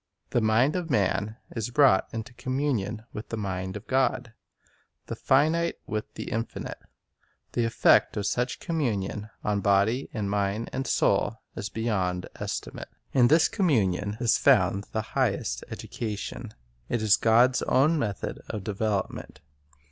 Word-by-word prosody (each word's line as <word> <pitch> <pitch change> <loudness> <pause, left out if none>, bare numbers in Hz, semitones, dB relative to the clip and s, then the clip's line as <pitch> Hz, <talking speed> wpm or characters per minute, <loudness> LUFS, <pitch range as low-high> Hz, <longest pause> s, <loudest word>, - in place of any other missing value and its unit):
The 120 - +2
mind 115 +8 +3
of 175 -2 -3
man 105 -2 0 0.2
is 115 -1 -2
brought 130 -6 +4
into 115 +2 -6
communion 120 -4 -2
with 105 - -7
the 115 - -3
mind 95 -1 -3
of 105 - -12
God, 130 -3 0 0.7
the - - -5
finite 160 +5 +2
with 110 0 -4
the - - -6
Infinite. 115 +1 -4 0.7
The 120 - 0
effect 115 - +4
of 100 - -1
such 125 +3 -1
com 165 -2 -3
munion 105 -5 -2
on 105 -1 0
body 100 +7 +2
and 105 -4 -3
mind 100 +2 -1
and 135 - -2
soul 100 +2 +2 0.2
is 100 - -4
beyond 95 -5 -1
estimate. - - -5 0.2
In 125 -2 +5
this 160 +5 +5
communion 105 - +1
is 120 -2 +3
found 100 +1 +3
the 110 - -1
highest - - 0
education. 110 +1 -5 0.4
It 120 -2 -1
is 105 -2 +6
God's 120 +3 +4
own 150 +5 +3
method 105 -6 -3
of 105 - -4
development. 100 -5 -3
110 Hz, 145 wpm, -27 LUFS, 100-125 Hz, 0.7 s, is